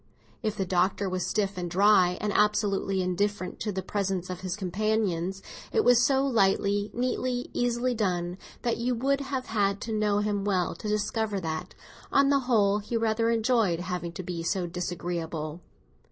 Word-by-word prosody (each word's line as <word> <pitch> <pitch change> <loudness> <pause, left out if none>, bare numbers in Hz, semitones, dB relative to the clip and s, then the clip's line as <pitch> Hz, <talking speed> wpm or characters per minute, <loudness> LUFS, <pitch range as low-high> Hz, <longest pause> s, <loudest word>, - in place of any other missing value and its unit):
If 215 -3 -1
the 195 - 0
Doctor 185 +2 +1
was 185 -1 -2
stiff 200 -3 -1
and 175 -1 -3
dry 185 -1 +4
and 210 -1 -1
absolutely 205 -2 +2
indifferent 185 +1 -1
to 210 - -2
the 190 -1 -3
presence 190 -2 -2
of 180 - -5
his 185 -1 -3
companions, 195 -2 -1 0.3
it 445 - +2
was 245 -1 +5
so 270 0 +3
lightly, 205 -3 +2
neatly, 250 0 -2
easily 245 +1 0
done, 180 -4 -1 0.2
that 235 - 0
you 245 +2 0
would 275 +4 +1
have 265 -2 -3
had 200 -2 0
to 225 - -3
know 210 -1 +1
him 205 -1 0
well 185 -4 +1
to 170 - -7
discover 210 0 0
that, 160 -2 -4 0.4
on 275 0 +4
the 280 -1 +4
whole, 205 -3 +4
he 215 +3 -3
rather 225 0 +1
enjoyed 225 -6 +2
having 180 -1 -3
to 185 - -6
be 175 -1 -4
so 180 +2 -1
disagreeable. 170 -2 -4
205 Hz, 170 wpm, -28 LUFS, 180-225 Hz, 0.4 s, was